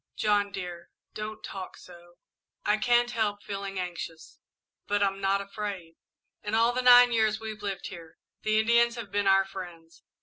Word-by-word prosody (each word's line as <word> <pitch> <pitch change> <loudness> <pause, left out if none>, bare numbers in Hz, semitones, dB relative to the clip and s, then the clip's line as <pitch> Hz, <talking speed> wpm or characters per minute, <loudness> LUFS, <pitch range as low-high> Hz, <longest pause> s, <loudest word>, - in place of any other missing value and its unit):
"John, 205 -1 +1
dear, 175 -3 -7 0.2
don't 215 0 -6
talk 190 -1 -7
so. 175 -1 -15 0.5
I 210 - +3
I - - +2
can't 240 +1 +3
help 210 -3 -1
feeling 195 -1 -5
anxious, 170 -3 -7 0.5
but 205 0 +1
I'm 195 0 0
not 195 0 +2
afraid. 200 -5 -6 0.4
In 210 +1 -2
all 230 +2 +4
the 255 - 0
nine 245 -1 +8
years 220 -2 +2
we've 220 -1 -7
lived 195 -2 -4
here, 165 -3 -11 0.2
the 215 0 +2
Indians 235 +2 +3
have 225 -5 -7
been 205 0 0
our 195 0 +5
friends. 175 -4 -10
205 Hz, 170 wpm, -28 LUFS, 185-220 Hz, 0.5 s, nine